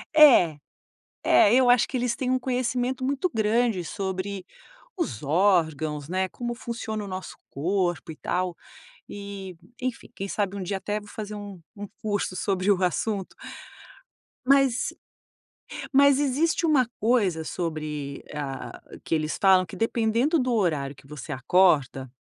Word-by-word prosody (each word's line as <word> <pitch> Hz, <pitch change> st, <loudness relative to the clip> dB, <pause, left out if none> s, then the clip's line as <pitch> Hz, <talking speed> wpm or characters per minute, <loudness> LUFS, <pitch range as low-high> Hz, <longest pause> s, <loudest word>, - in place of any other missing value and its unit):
é, 245 Hz, -, +7 dB, 0.7 s
é 205 Hz, -, +5 dB
eu 255 Hz, -1 st, +5 dB
acho 245 Hz, -2 st, +5 dB
que -, -, -3 dB
eles 245 Hz, -1 st, 0 dB
têm 255 Hz, -1 st, -2 dB
um 255 Hz, -, +2 dB
conhecimento 255 Hz, 0 st, -1 dB
muito 280 Hz, +6 st, 0 dB
grande 220 Hz, -3 st, +1 dB
sobre 190 Hz, +1 st, -4 dB, 0.5 s
os 335 Hz, -, -3 dB
órgãos, 155 Hz, -3 st, +1 dB
né, 185 Hz, +1 st, 0 dB
como 240 Hz, +4 st, -5 dB
funciona 230 Hz, -3 st, -5 dB
o -, -, -7 dB
nosso 185 Hz, 0 st, -7 dB
corpo 175 Hz, +1 st, -1 dB
e -, -, -13 dB
tal. 180 Hz, +3 st, -2 dB, 0.5 s
E, 200 Hz, -3 st, -8 dB, 0.3 s
enfim, 255 Hz, -2 st, -4 dB
quem 195 Hz, -, -5 dB
sabe 200 Hz, -1 st, -2 dB
um 195 Hz, -, -4 dB
dia 195 Hz, +2 st, -2 dB
até 210 Hz, +2 st, -3 dB
vou 205 Hz, -, -15 dB
fazer 210 Hz, 0 st, -6 dB
um 205 Hz, -2 st, -8 dB, 0.2 s
um 205 Hz, 0 st, -7 dB
curso 205 Hz, -3 st, -1 dB
sobre 190 Hz, +1 st, 0 dB
o 190 Hz, -2 st, +2 dB
assunto. 195 Hz, +2 st, -2 dB, 1.1 s
Mas 275 Hz, -2 st, +3 dB, 1.0 s
mas 280 Hz, 0 st, +6 dB
existe 295 Hz, +5 st, +1 dB
uma 275 Hz, -7 st, +3 dB
coisa 205 Hz, -8 st, +1 dB
sobre 155 Hz, -4 st, -4 dB
a 140 Hz, -2 st, -5 dB, 0.2 s
a -, -, -13 dB
que -, -, -3 dB
eles 155 Hz, -1 st, 0 dB
falam 190 Hz, -2 st, +5 dB
que -, -, -10 dB
dependendo 230 Hz, +7 st, +1 dB
do 250 Hz, -2 st, 0 dB
horário 155 Hz, -10 st, 0 dB
que 135 Hz, -, -19 dB
você 150 Hz, +1 st, -7 dB
acorda, 135 Hz, -3 st, +2 dB
200 Hz, 150 wpm, -26 LUFS, 175-245 Hz, 1.1 s, é